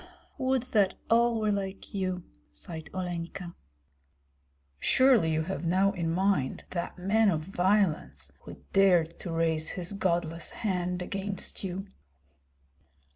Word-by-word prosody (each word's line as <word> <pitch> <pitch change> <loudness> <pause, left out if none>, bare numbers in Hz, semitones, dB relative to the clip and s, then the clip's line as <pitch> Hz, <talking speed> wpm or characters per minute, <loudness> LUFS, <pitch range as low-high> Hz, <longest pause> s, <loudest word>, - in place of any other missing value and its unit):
"Would 260 -2 +1
that 200 -4 +4 0.2
all 235 0 +4
were 215 -1 +1
like 195 -1 -4
you!" 185 -2 -2 0.3
sighed 160 - -8
Olenka. 175 -1 -4 1.3
"Surely 255 - +5
you 160 0 +1
have 190 +2 -4
now 190 +4 +3
in 170 -4 -2
mind 180 -6 +1
that 175 0 -3
man 205 +4 +3
of 160 -5 +1
violence 175 - +1
who - - -11 0.2
dared 175 -4 +4
to 175 - -5
raise 165 -1 +1
his 180 +1 -4
godless 170 -4 -1 0.2
hand 180 -2 0
against 195 +1 -4
you." 190 +1 -3
180 Hz, 125 wpm, -29 LUFS, 165-195 Hz, 1.3 s, Surely